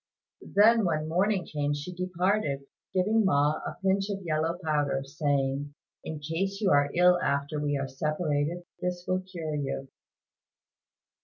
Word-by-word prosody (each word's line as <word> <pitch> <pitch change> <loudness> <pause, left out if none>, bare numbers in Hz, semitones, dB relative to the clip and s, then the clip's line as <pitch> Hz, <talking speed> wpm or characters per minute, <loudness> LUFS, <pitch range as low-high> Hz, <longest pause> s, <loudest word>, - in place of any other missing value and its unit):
Then 225 +2 +6
when 155 -4 0
morning 185 +3 +1
came, 145 -1 -1
she 145 +5 -6
departed, 180 -5 0 0.3
giving 215 +4 +2
Ma 150 -5 +3
a - - -6
pinch 195 +1 +2
of 195 -1 -3
yellow 160 +1 0
powder, 145 -3 +1
saying, 140 0 -1 0.3
"In 160 - -5
case 165 +7 -2
you 205 -3 +2
are 145 0 +4
ill 180 0 +5
after 140 +2 0
we 145 -1 0
are 135 0 -2
separated, 150 +4 -1 0.2
this 180 -1 -3
will 185 0 +1
cure 170 -5 -5
you." 135 -2 -3
160 Hz, 145 wpm, -28 LUFS, 145-185 Hz, 0.3 s, Then